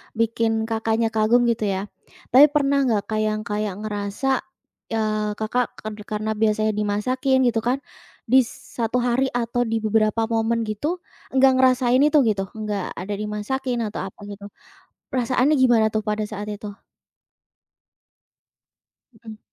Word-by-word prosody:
bikin 225 Hz, 0 st, +1 dB
Kakaknya 225 Hz, 0 st, 0 dB
kagum 225 Hz, +3 st, +3 dB
gitu 230 Hz, -3 st, +1 dB
ya. 190 Hz, -1 st, -1 dB, 0.5 s
Tapi 275 Hz, +4 st, +8 dB
pernah 280 Hz, -2 st, +1 dB
enggak 215 Hz, -4 st, +1 dB
Kak, 215 Hz, -, 0 dB
yang 215 Hz, 0 st, -2 dB
kayak 210 Hz, -3 st, -3 dB
ngerasa, 210 Hz, +5 st, -1 dB, 0.5 s
eee, 215 Hz, -1 st, -1 dB
Kakak 225 Hz, +3 st, -1 dB
ka 215 Hz, -, -7 dB, 0.2 s
karena 215 Hz, +1 st, -2 dB
biasanya 215 Hz, 0 st, +1 dB
dimasakin 255 Hz, +6 st, 0 dB
gitu 225 Hz, -, 0 dB
kan, 250 Hz, +5 st, -1 dB, 0.4 s
bis 255 Hz, +1 st, +4 dB, 0.3 s
1 235 Hz, +2 st, 0 dB
hari 250 Hz, +2 st, +2 dB
atau 245 Hz, 0 st, 0 dB
di 225 Hz, 0 st, -1 dB
beberapa 215 Hz, +1 st, +2 dB
momen 230 Hz, +1 st, +1 dB
gitu, 290 Hz, -, -3 dB, 0.3 s
enggak 265 Hz, 0 st, +6 dB
ngerasain 255 Hz, -1 st, +4 dB
itu 300 Hz, +2 st, +4 dB
gitu, 200 Hz, -4 st, 0 dB
enggak 210 Hz, -3 st, -4 dB
ada 190 Hz, +4 st, -5 dB
dimasakin 230 Hz, +4 st, -2 dB
atau -, -, -5 dB
apa 190 Hz, -, -14 dB
gitu. 200 Hz, 0 st, -9 dB, 0.6 s
Perasaannya 255 Hz, +3 st, +2 dB
gimana 235 Hz, -4 st, +4 dB
tuh 215 Hz, 0 st, -1 dB
pada 210 Hz, 0 st, -1 dB
saat 210 Hz, -1 st, -5 dB
itu? 210 Hz, 0 st, -6 dB, 2.4 s
Mhm. 220 Hz, -1 st, -12 dB
225 Hz, 140 wpm, -23 LUFS, 215-250 Hz, 2.4 s, Tapi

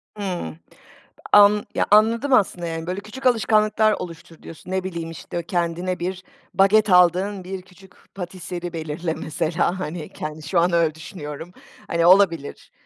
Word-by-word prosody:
Hıı. 180 Hz, -, -4 dB, 0.8 s
An 205 Hz, 0 st, +6 dB
Ya, -, -, +2 dB
anladım 230 Hz, +6 st, +4 dB
aslında, 180 Hz, -7 st, +2 dB
yani, 165 Hz, 0 st, -5 dB
böyle, 185 Hz, +2 st, -3 dB
küçük 260 Hz, +6 st, -10 dB
alışkanlıklar 215 Hz, -2 st, +3 dB
oluştur, 165 Hz, -3 st, -8 dB
diyorsun, 165 Hz, +3 st, -11 dB
ne 190 Hz, 0 st, -1 dB
bileyim, 170 Hz, -3 st, -5 dB
işte, 170 Hz, +2 st, -6 dB
kendine 175 Hz, 0 st, -2 dB
bir 185 Hz, +1 st, -4 dB, 0.3 s
baget 210 Hz, +2 st, +4 dB
aldığın, 185 Hz, +2 st, +3 dB
bir 190 Hz, +1 st, -6 dB
küçük 190 Hz, +1 st, -19 dB, 0.2 s
pâtisserie 180 Hz, -1 st, -6 dB
belirle 160 Hz, +1 st, -3 dB
mesela, 165 Hz, +4 st, -1 dB
hani, 165 Hz, -2 st, -5 dB
kendi 155 Hz, +1 st, -7 dB
şu 175 Hz, +1 st, +2 dB
an 175 Hz, +1 st, +2 dB
öyle 165 Hz, -2 st, +2 dB
düşünüyorum. 160 Hz, 0 st, -8 dB, 0.4 s
Hani 170 Hz, 0 st, +1 dB
olabilir, 175 Hz, -5 st, +3 dB
180 Hz, 145 wpm, -22 LUFS, 165-195 Hz, 0.8 s, An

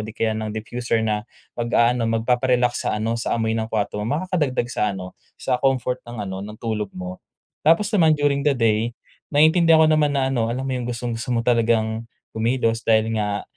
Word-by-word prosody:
di 110 Hz, +1 st, -7 dB
kaya 110 Hz, -1 st, +1 dB
ng 110 Hz, 0 st, -3 dB
diffuser 110 Hz, +1 st, -2 dB
na 105 Hz, 0 st, -2 dB, 0.3 s
mag-aano 120 Hz, 0 st, +2 dB
magpapa-relax 125 Hz, +2 st, +1 dB
sa -, -, 0 dB
ano 115 Hz, +2 st, -2 dB
sa 115 Hz, -, -1 dB
amoy 110 Hz, -1 st, 0 dB
ng 110 Hz, 0 st, -1 dB
kwarto 105 Hz, -1 st, -2 dB
mo. 115 Hz, +7 st, -1 dB
Makaka-dagdag 155 Hz, -9 st, -1 dB
sa -, -, -2 dB
ano 90 Hz, -1 st, -7 dB, 0.2 s
sa 125 Hz, -2 st, -1 dB
comfort 130 Hz, -2 st, 0 dB
ng 115 Hz, -3 st, -5 dB
ano, 95 Hz, -1 st, -5 dB
ng 105 Hz, +2 st, -8 dB
tulog 110 Hz, -3 st, -3 dB
mo. 90 Hz, 0 st, -7 dB, 0.5 s
Tapos 180 Hz, +6 st, +4 dB
naman 165 Hz, -7 st, +5 dB
during 145 Hz, -1 st, +1 dB
the 145 Hz, -, +4 dB
day, 115 Hz, 0 st, +1 dB, 0.3 s
naiintindihan 160 Hz, +2 st, +5 dB
ko -, -, +5 dB
naman 150 Hz, -2 st, +2 dB
na 135 Hz, -1 st, +1 dB
ano, 120 Hz, -4 st, +1 dB
alam 125 Hz, +3 st, -2 dB
mo 135 Hz, -, -3 dB
yung 125 Hz, -2 st, -3 dB
gustong-gusto 120 Hz, 0 st, -4 dB
mo 115 Hz, -, +1 dB
talagang 115 Hz, -1 st, +1 dB, 0.3 s
kumilos 115 Hz, 0 st, 0 dB
dahil 110 Hz, 0 st, +3 dB
nga, 105 Hz, -1 st, -1 dB
115 Hz, 190 wpm, -22 LUFS, 110-130 Hz, 0.5 s, naman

